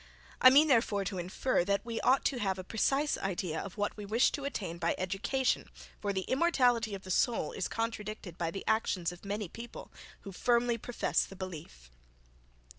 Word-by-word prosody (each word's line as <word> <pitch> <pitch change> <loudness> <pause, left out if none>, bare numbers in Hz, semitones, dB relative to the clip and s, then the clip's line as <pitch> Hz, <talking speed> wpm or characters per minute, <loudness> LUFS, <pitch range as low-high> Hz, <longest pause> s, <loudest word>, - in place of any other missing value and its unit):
I 255 - +11
mean, 290 +4 +6
therefore 225 -7 +2
to 185 0 -3
infer, 180 +5 0
that 200 +2 0
we 230 -1 -3
ought 265 +2 +3
to 260 - +1
have 195 -3 0
a 185 - -5
precise 275 +9 +1
idea 180 -4 -2
of 200 +1 -8
what 205 0 -1
we 210 - -7
wish 220 +5 +3
to 280 - -4
attain 185 -11 -4
by 170 - +1
education, 195 +8 0 0.3
for 205 - -1
the 190 -1 -1
immortality 245 - +2
of 195 - -9
the 185 - -6
soul 225 -4 +1
is 185 - -2
contradicted 215 -5 -4
by 170 -2 -2
the 195 +4 -6
actions 200 -6 +1
of 175 - -13
many 205 0 -3
people, 235 +7 -9 0.3
who 200 - -8
firmly 235 +3 +1
profess 245 +2 0
the 195 - -10
belief. 150 - -8
205 Hz, 190 wpm, -31 LUFS, 185-240 Hz, 0.3 s, I